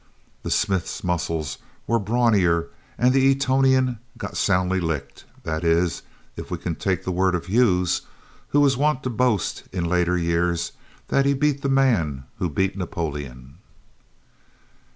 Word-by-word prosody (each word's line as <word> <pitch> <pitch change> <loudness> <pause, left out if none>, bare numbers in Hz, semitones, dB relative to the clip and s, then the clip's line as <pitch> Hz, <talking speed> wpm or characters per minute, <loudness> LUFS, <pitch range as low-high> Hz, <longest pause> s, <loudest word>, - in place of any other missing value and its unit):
The - - -5
smith's 95 -5 -1
muscles 85 -4 -2 0.3
were 115 0 +1
the 100 - -7
brawnier, 100 -8 +2 0.3
and 125 +1 +3
the 135 0 +4
Etonian 130 -2 +2 0.2
got - - -6
soundly 95 -1 +1
licked 75 -5 -4 0.2
that 80 +1 -3
is, 85 +1 +1 0.3
if - - -8
we - - -3
can 85 - -3
take 95 +1 -1
the 95 - -2
word 90 0 +2
of 90 - -3
Hughes 90 -4 +2 0.5
who 145 - +2
was 140 -2 +4
wont 145 0 +1
to 130 - -2
boast 115 -5 0
in 90 -2 -2
later 90 +1 +1
years 85 0 0 0.4
that 140 0 +2
he 140 - +3
beat 145 0 +1
the 140 - -1
man 105 - +2 0.2
who 90 - 0
beat 95 +6 0
Napoleon! 75 -6 -5
95 Hz, 150 wpm, -23 LUFS, 85-125 Hz, 0.5 s, the